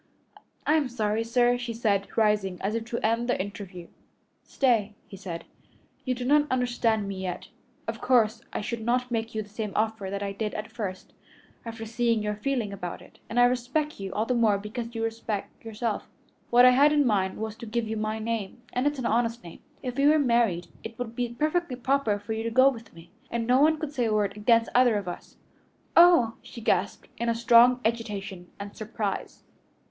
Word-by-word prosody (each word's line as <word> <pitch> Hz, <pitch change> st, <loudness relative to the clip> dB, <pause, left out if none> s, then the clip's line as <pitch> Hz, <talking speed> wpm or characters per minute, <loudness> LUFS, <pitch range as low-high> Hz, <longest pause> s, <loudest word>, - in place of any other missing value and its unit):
"I 300 Hz, -, +3 dB
am 285 Hz, -4 st, 0 dB
sorry, 220 Hz, -2 st, -1 dB
sir," 245 Hz, +1 st, +2 dB
she 240 Hz, -2 st, -4 dB
said, 200 Hz, -4 st, +1 dB
rising, 210 Hz, -4 st, +2 dB
as 200 Hz, +2 st, -2 dB
if 230 Hz, 0 st, -2 dB
to 235 Hz, 0 st, -4 dB
end 230 Hz, +2 st, +1 dB
the -, -, +1 dB
interview. 190 Hz, -3 st, -6 dB, 0.6 s
"Stay," 225 Hz, -6 st, +1 dB
he -, -, -10 dB
said, 185 Hz, -3 st, -6 dB, 0.6 s
"you 255 Hz, -1 st, 0 dB
do 245 Hz, 0 st, -5 dB
not 295 Hz, +2 st, +4 dB
understand 240 Hz, -4 st, +1 dB
me 195 Hz, -1 st, -5 dB
yet. 180 Hz, -2 st, -5 dB, 0.4 s
Of -, -, -4 dB
course 230 Hz, -3 st, +3 dB
I -, -, -3 dB
should 235 Hz, +2 st, -4 dB
not 250 Hz, +2 st, 0 dB
make 225 Hz, -1 st, -2 dB
you 215 Hz, -, -1 dB
the 205 Hz, -, -17 dB
same 215 Hz, 0 st, -4 dB
offer 215 Hz, -2 st, -1 dB
that 200 Hz, +1 st, -3 dB
I 200 Hz, -, -2 dB
did 210 Hz, +1 st, -4 dB
at 215 Hz, 0 st, -5 dB
first, 190 Hz, -6 st, -6 dB, 0.5 s
after 225 Hz, 0 st, -6 dB
seeing 230 Hz, -1 st, 0 dB
your 210 Hz, 0 st, -1 dB
feeling 220 Hz, -1 st, -2 dB
about 180 Hz, -3 st, -6 dB
it, -, -, -19 dB
and 235 Hz, -, 0 dB
I -, -, +7 dB
respect 255 Hz, +5 st, 0 dB
you 195 Hz, -1 st, -5 dB
all 215 Hz, -, 0 dB
the 250 Hz, -, 0 dB
more 225 Hz, -4 st, +3 dB
because 230 Hz, +3 st, -6 dB
you 225 Hz, -, -2 dB
so -, -, +1 dB
respect 225 Hz, -2 st, -5 dB
yourself. 225 Hz, 0 st, -3 dB, 0.4 s
What 245 Hz, +1 st, +7 dB
I 250 Hz, -, +8 dB
had 280 Hz, +4 st, +5 dB
in 295 Hz, -1 st, +3 dB
mind 195 Hz, -5 st, +1 dB
was 220 Hz, 0 st, -4 dB
to 235 Hz, -, -9 dB
give 225 Hz, +1 st, -2 dB
you 220 Hz, -, -3 dB
my 215 Hz, 0 st, -2 dB
name, 225 Hz, 0 st, -4 dB
and 250 Hz, +3 st, +1 dB
it's 290 Hz, 0 st, -1 dB
an 255 Hz, -, -4 dB
honest 235 Hz, +1 st, 0 dB
name. 170 Hz, -, -11 dB, 0.2 s
If 250 Hz, -1 st, -4 dB
we 280 Hz, +1 st, +4 dB
were 310 Hz, +1 st, +6 dB
married 235 Hz, -, +2 dB, 0.2 s
it 225 Hz, 0 st, -8 dB
would 235 Hz, -2 st, -5 dB
be 245 Hz, 0 st, -1 dB
perfectly 305 Hz, +3 st, -1 dB
proper 255 Hz, -4 st, +1 dB
for 205 Hz, +2 st, -5 dB
you 220 Hz, -, -3 dB
to 230 Hz, -, -2 dB
go 260 Hz, +4 st, +6 dB
with 230 Hz, -4 st, -8 dB
me, 165 Hz, +1 st, -15 dB, 0.2 s
and 235 Hz, -1 st, -2 dB
no 250 Hz, +3 st, +4 dB
one 315 Hz, +1 st, +4 dB
could 300 Hz, -1 st, -5 dB
say 250 Hz, -4 st, 0 dB
a 220 Hz, -, +1 dB
word 200 Hz, -2 st, 0 dB
against 230 Hz, +2 st, +3 dB
either 245 Hz, -2 st, +5 dB
of 200 Hz, -3 st, -5 dB
us." 175 Hz, -, -8 dB, 0.6 s
"Oh!" 340 Hz, -10 st, +6 dB
she -, -, -11 dB
gasped, 225 Hz, -, 0 dB
in 235 Hz, 0 st, 0 dB
strong 240 Hz, +1 st, +6 dB
agitation 205 Hz, -5 st, -3 dB
and 200 Hz, 0 st, -7 dB
surprise. 215 Hz, -2 st, -4 dB
230 Hz, 210 wpm, -27 LUFS, 210-245 Hz, 0.6 s, I